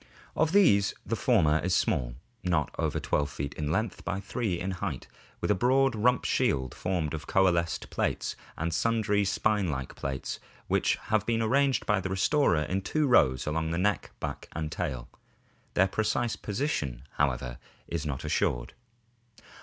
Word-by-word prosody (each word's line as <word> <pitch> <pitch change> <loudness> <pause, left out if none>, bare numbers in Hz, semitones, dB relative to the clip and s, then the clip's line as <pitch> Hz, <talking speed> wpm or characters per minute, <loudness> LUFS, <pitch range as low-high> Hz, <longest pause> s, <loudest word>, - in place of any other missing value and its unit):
Of 160 0 +2
these 155 - +4
the - - -1
former 75 0 +3
is 90 +1 +1
small, - - 0 0.3
not 85 -5 0
over - - 0
12 70 0 0
feet 70 0 -5
in 75 -1 -3
length 110 +4 -1
by 90 +2 -2
3 100 -2 -2
in 95 +2 -2
height, 90 - -4 0.3
with - - 0
a - - +6
broad 130 +5 +3
rump 125 +3 +2
shield 65 -2 +1
formed 85 -5 -2
of 75 -1 -5
coalesced 85 -5 +1
plates, - - -1 0.2
and 85 +1 -2
sundry 105 +1 +2
spine 105 0 +1
like 65 -3 -4
plates 70 -1 -4 0.3
which - - +2 0.2
have 110 -1 +2
been 115 -1 +1
arranged 135 +4 +2
by 105 -3 +2
the 95 - -3
restorer 95 - +2
in 95 +4 -1
two 155 +9 0
rows 65 - +4
along 80 +1 -1
the 85 - -1
neck, 100 +3 0
back, - - -5
and 80 -1 -3
tail. 65 -9 -3 0.7
Their 95 - +5
precise 110 +3 0
position, 95 - -2
however, 65 -4 0 0.3
is 85 -3 -3
not 70 -4 -4
assured. - - 0
90 Hz, 160 wpm, -29 LUFS, 75-110 Hz, 0.7 s, a